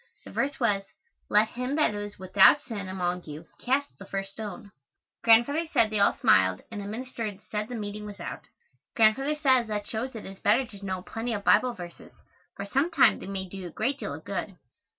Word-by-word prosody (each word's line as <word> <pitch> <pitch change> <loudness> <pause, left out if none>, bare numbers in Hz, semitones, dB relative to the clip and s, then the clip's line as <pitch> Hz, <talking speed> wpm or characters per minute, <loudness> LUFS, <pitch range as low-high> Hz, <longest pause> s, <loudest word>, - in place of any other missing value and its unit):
The - - -10
verse 275 0 -1
was, 205 -5 +2 0.5
"Let 210 +1 +4
him 250 +4 -3
that 300 -8 +2
is 205 0 -6
without 190 +8 +6
sin 210 -9 -6
among 180 -1 -2
you 150 +2 -8
cast 275 +3 -1
the 195 - -9
first 195 0 -4
stone." 205 -1 -8 0.5
Grandfather 240 +9 +4
said 220 -2 +3
they 215 - 0
all 200 - +4
smiled, 95 0 +4
and 210 -2 -5
the 200 - -6
minister 225 -2 -5
said 210 0 -2
the 245 - -6
meeting 210 -1 -5
was 205 - -9
out. - - -7 0.5
Grandfather 265 +7 +3
says 260 -6 +3
that 210 -1 -3
shows 240 +3 -4
it 220 - -7
is 195 0 -9
better 230 +6 +3
to 200 -4 -13
know 185 -2 -3
plenty 225 +3 -4
of 205 -2 -3
Bible 250 +3 +4
verses, 175 -1 -10 0.4
for 200 - -5
some 275 +11 +1
time 325 -5 +4
they - - -8
may 190 -1 -4
do 195 - -9
you 185 -2 -6
a - - -10
great 270 - -1
deal - - -4
of - - -11
good. - - -4
215 Hz, 210 wpm, -27 LUFS, 195-250 Hz, 0.5 s, without